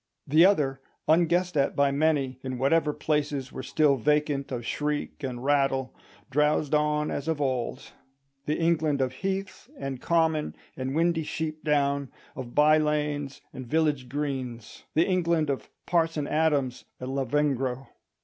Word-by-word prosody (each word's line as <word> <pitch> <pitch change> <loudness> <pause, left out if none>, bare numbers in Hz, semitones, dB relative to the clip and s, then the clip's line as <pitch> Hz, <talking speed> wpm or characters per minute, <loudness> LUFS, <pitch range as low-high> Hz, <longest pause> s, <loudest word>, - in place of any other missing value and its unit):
The 155 +4 +6
other, 140 -9 +1 0.3
unguessed 175 +2 +3
at 140 -2 +1
by 140 -1 +3
many, 140 -3 +1
in 130 -1 -4
whatever 150 +4 +2
places 145 -3 -1
were - - -6
still 140 +1 +2
vacant 145 +1 0
of 120 -2 -4
shriek 150 +3 -2
and 125 -2 -4
rattle, 135 -2 +1 0.4
drowsed 150 +1 +2
on 150 0 +1
as 145 - -4
of 160 -2 0
old: 130 -2 -2 0.6
the 150 - 0
England 160 -3 +1
of 130 -1 0
heath 195 - -4
and 135 -2 -5
common 160 -2 +1 0.2
and 130 +1 -3
windy 165 0 +2
sheep 155 0 -4
down, 140 -2 +1 0.3
of 125 -2 -7
by 155 +1 +6
lanes 150 -2 -1
and 130 -1 -8
village 150 -3 +1
greens—the 135 +1 -2
England 170 -5 +1
of 135 - -5 0.2
Parson 165 -3 +1
Adams 145 -5 0
and 130 +1 -5
Lavengro. 135 -1 0
145 Hz, 140 wpm, -27 LUFS, 135-155 Hz, 0.6 s, The